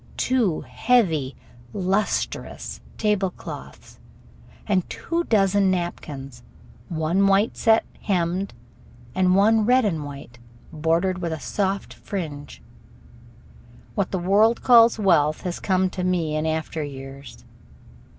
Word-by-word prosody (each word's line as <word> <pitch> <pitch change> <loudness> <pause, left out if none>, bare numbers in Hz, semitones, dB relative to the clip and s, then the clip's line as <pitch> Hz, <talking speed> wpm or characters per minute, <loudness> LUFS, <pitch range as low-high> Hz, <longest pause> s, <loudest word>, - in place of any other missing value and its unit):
Two 235 -10 +1
heavy, 165 - +1 0.4
lustrous 195 +2 -2 0.2
table 210 -3 +1
cloths - - -11 0.7
and 190 -4 0
two 340 +1 -2
dozen 200 -2 +3
napkins, 145 -8 -4 0.5
one 170 +4 +1
white 195 +3 +3
set 225 -1 +3 0.2
hemmed, 185 0 0 0.6
and 185 +2 +3
one 215 +3 +4
red 250 +2 +4
and 165 -7 -1
white, 140 -4 -10 0.3
bordered 165 +4 0
with 170 -2 -3
a 160 - -4
soft 195 +2 -2
fringe. 150 -7 -7 1.3
What 200 -3 -1
the 190 - -2
world 205 +6 +3
calls 235 -2 +6
wealth 165 -7 +2
has 180 -1 -4
come 190 -1 +1
to 185 - -4
me 170 -4 0
in 155 +1 -1
after 160 0 -2
years. 135 -1 -10
185 Hz, 115 wpm, -23 LUFS, 160-205 Hz, 1.3 s, calls